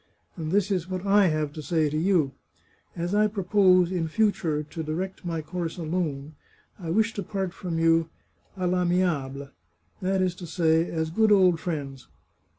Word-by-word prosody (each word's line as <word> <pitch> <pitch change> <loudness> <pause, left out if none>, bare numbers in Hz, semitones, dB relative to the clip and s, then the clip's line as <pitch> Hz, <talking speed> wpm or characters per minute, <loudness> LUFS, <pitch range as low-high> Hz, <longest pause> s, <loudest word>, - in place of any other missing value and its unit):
And 160 -3 -4
this 205 +1 +2
is 185 -2 -1
what 185 0 -4
I 200 0 +5
have 155 -2 -1
to 155 - -6
say 160 0 +1
to 150 - -3
you: 160 -4 +2 0.6
As 175 +2 -3
I 210 +1 +4
propose, 185 -3 +3
in 175 -3 -1
future, 165 -6 0
to 155 +2 -7
direct 175 +6 -4
my 165 -3 -3
course 170 +1 -4
alone, 155 -4 -3 0.5
I 170 -3 -6
wish 220 +5 +2
to 200 - -4
part 190 -1 -3
from 175 -4 -4
you 165 0 +3 0.2
* - - -34
d, 185 - -4
I' 180 0 +1
amiable 155 -7 0 0.2
' 85 0 -45
— 90 - -38
that 190 0 +1
is 180 -1 0
to 175 - -8
say, 165 0 +2
as 160 -1 -2
good 220 +5 +3
old 185 -4 +5
friends. 140 -6 -5
175 Hz, 190 wpm, -26 LUFS, 155-185 Hz, 0.6 s, I